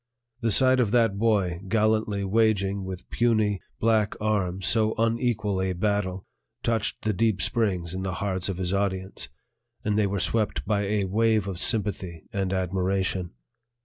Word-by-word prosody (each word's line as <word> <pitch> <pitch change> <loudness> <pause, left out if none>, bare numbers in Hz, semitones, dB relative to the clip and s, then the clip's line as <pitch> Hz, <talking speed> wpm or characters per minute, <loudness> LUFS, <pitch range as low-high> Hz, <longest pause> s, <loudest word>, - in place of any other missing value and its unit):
The 115 -2 0
sight 130 +4 +5
of 120 -4 +2
that 115 -3 +2
boy 100 -6 +1
gallantly 110 -1 +1
waging 100 -2 +1
with 95 -1 -7
puny, 110 -4 +2 0.2
black 110 -2 +2
arms 95 -4 -1
so 110 +1 +2
unequal 115 -4 0
a 95 0 0
battle 95 0 -1 0.4
touched 110 -2 -1
the 110 - +1
deep 110 -1 +1
springs 95 -7 0
in 95 - -3
the 95 -1 -3
hearts 95 -1 -2
of 95 - -3
his 90 0 -1
audience, 95 -1 -2 0.6
and 105 0 +1
they 105 - +3
were 100 +1 -2
swept 110 -3 0
by 105 -2 0
a 100 -1 0
wave 110 +1 +2
of 95 -3 -4
sympathy 95 -7 -1
and 95 -2 -1
admiration. 95 -1 -1
100 Hz, 155 wpm, -26 LUFS, 95-110 Hz, 0.6 s, sight